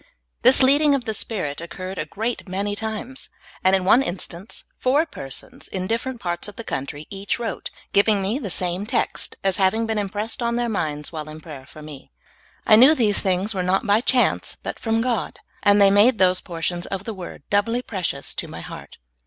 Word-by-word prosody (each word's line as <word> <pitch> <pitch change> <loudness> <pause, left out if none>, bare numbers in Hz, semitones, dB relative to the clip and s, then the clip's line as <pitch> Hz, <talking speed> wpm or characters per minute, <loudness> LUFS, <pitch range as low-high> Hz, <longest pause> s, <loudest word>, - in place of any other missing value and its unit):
This 255 +2 +8
leading 285 +2 +6
of 255 -4 -3
the 220 - -2
Spirit 185 -9 -4
occured 185 +2 -6
a 155 - -3
great 225 +6 -4
many 200 +2 -2
times; 220 +4 -5 0.3
and 190 +1 +5
in 190 -1 -1
one 235 +7 +6
instance 185 -3 -6 0.2
four 280 +5 +3
persons, 135 - -8
in 185 -1 -4
different 230 +4 -2
parts 175 0 -3
of 205 - -9
the 230 - -7
country, 145 -3 -5
each 195 0 -2
wrote, 235 -1 -4 0.2
giving 205 +1 +4
me 200 +7 -1
the 220 -9 -5
same 180 +3 -1
text, 240 -1 -1
as 195 -1 +2
having 200 +4 +2
been 220 -1 -1
impressed 210 +5 -4
on 235 0 0
their 240 0 0
minds 150 -8 -2
while 155 -2 -6
in 155 +1 -9
prayer 145 -5 -10
for 155 - -12
me. 150 -3 -11 0.6
I 215 - +7
knew 265 +7 +8
these 220 -7 +3
things 190 +3 0
were 190 - -1
not 185 +4 +1
by 210 +1 +4
chance, 255 -1 +1
but - - -5
from 225 0 0
God, 240 -5 -1 0.2
and 205 0 +5
they 200 -1 +6
made 215 +4 +5
those 185 -1 +3
portions 175 +1 -3
of 195 -1 -4
the 225 - -5
w^ord 185 -3 -9
doubly 230 +4 +1
precious 180 - -3
to - - -4
my - - -8
heart. - - -10
200 Hz, 200 wpm, -23 LUFS, 180-230 Hz, 0.6 s, This